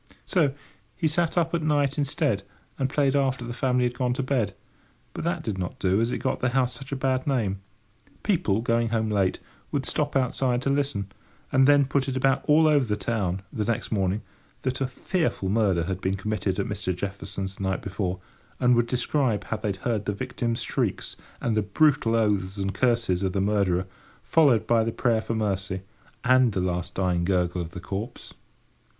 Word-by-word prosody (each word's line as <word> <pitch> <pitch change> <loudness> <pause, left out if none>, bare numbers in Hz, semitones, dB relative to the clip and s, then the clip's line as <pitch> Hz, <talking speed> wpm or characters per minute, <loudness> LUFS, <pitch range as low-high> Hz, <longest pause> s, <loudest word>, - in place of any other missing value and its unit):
So 150 -8 +2 0.4
he 160 - +1
sat 165 +2 0
up 165 -1 +2
at 170 - +1
night 150 -1 +1
instead, 140 -6 0 0.4
and 135 -1 +1
played 140 -1 +2
after 135 -3 +1
the 120 - -5
family 125 0 +1
had 125 0 +1
gone 125 -1 0
to 135 - -1
bed, 120 -7 0 0.6
but - - -5
that - - -1
did 100 -3 -3
not 90 -2 -4
do, 95 +3 +2
as 115 +1 +1
it - - -1
got - - -1
the 130 - +1
house 125 -1 +2
such 135 +3 -9
a - - 0
bad 130 0 0
name. 105 -8 0 0.6
People, 165 - +1
going 115 0 +1
home 110 -1 0
late, 95 -3 +2 0.3
would 140 -2 -1
stop 145 -1 -1
outside 125 -1 +1
to 135 - +1
listen, 135 -9 -1 0.4
and 130 0 +5
then 145 -1 +6
put 135 0 0
it 130 - -2
about 135 +1 +2
all 155 +1 +6
over 145 -3 +4
the 105 -2 0
town, 95 -3 -2
the 110 - -1
next 115 +1 -2
morning, 100 -1 0 0.4
that 130 0 -2
a 135 - +2
fearful 155 - -1
murder 100 -5 +2
had 95 +2 -3
been 95 +1 0
committed 100 -1 -2
at 100 - 0
Mr. 105 -5 -2
Jefferson's 95 0 -5
the - - -9
night 95 -1 -1
before; 95 -2 -2 0.4
and 125 0 +4
would 120 0 +3
describe 125 -3 +1
how 110 - -3
they 105 0 -4
had 100 - -1
heard 110 -4 0
the 105 - 0
victim's 120 +1 -2
shrieks - - -2 0.2
and 115 -2 0
the 110 - +3
brutal 115 +2 +3
oaths 100 -3 +1
and 95 0 -1
curses 115 -7 +1
of 95 -2 0
the 100 - 0
murderer, 95 -2 +1 0.4
followed 140 -9 +4
by 115 -1 +3
the 115 - -1
prayer 115 -2 +1
for 115 - -3
mercy, 95 -3 -2 0.4
and 125 -2 +4
the 95 - 0
last 90 -1 -2
dying 90 -2 +1
gurgle 90 -1 +1
of 85 - -5
the 90 - -8
corpse. 95 +5 -6
115 Hz, 200 wpm, -26 LUFS, 95-130 Hz, 0.6 s, then